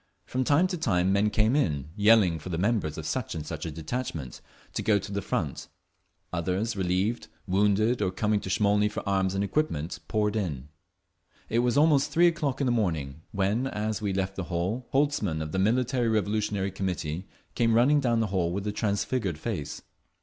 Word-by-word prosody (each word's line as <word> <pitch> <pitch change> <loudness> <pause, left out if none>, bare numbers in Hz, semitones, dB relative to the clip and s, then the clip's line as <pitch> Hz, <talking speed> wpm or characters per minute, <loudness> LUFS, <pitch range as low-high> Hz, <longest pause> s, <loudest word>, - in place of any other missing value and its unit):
From 130 +1 -1
time 145 +7 +4
to 180 -2 -2
time 95 - +2
men 100 +2 +3
came 110 +4 +2
in, 75 - 0
yelling 105 -5 +4
for 80 - -8
the 85 - -2
members 95 -5 0
of 80 - -5
such 115 +4 -2
and 80 -2 -5
such 80 +1 -5
a - - -4
detachment, 80 - -5 0.3
to - - -2
go 105 -2 +3
to 100 +1 -5
the 100 0 -2
front; - - -3 0.7
others, 95 +6 -1
relieved, 95 +5 0 0.2
wounded, 105 +4 +2
or 95 - +2
coming 105 +2 0
to 95 - -7
Smolny 105 +1 +3
for 105 - -6
arms 95 -1 +1
and 100 - +1
equipment, 95 - -1
poured 105 -1 0
in…. 75 -10 -3 0.8
It 115 - +2
was 125 +2 +2
almost 145 -2 +4
three 170 +2 +4
o'clock 155 -6 +1
in 140 - +1
the 125 - +2
morning 80 - -1
when, 100 +6 0
as 110 -2 -2
we 100 -2 -1
left 95 0 -2
the 95 - -3
hall, 95 +9 -2
Holtzman, 135 - +1
of 80 -1 -4
the 95 - -1
Military 120 +3 +2
Revolutionary 105 -2 0
Committee, 90 -2 -3 0.3
came 115 -1 +2
running 135 +6 +5
down 120 -4 +1
the 110 - +1
hall 85 -3 +1
with 100 +3 -3
a 105 - 0
transfigured 100 -3 -1
face. 85 -5 -4
105 Hz, 190 wpm, -27 LUFS, 90-115 Hz, 0.8 s, running